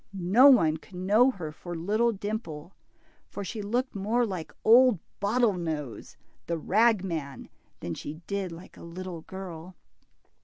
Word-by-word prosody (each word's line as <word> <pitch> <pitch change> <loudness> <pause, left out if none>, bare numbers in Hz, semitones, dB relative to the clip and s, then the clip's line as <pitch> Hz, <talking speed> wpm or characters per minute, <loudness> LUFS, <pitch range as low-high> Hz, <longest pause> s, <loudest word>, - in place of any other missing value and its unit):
No 195 +8 +5
one 165 - +5
could 180 - -16
know 205 +8 +4
her 180 -11 -5
for 175 +3 -8
little 215 +8 +1
Dimple, 195 -6 -5 0.6
for 200 - -6
she 210 +3 -5
looked 245 +6 -1
more 220 +5 +1
like 185 -7 -5
old 245 0 +7 0.2
Bottlenose, 175 - -1 0.3
the 170 - -1
ragman, 185 - 0 0.3
than 85 - -4
she 145 - -6
did 200 -3 -3
like 170 +3 -12
a - - -12
little 170 0 -7
girl. 180 -1 -9
190 Hz, 140 wpm, -28 LUFS, 165-220 Hz, 0.6 s, old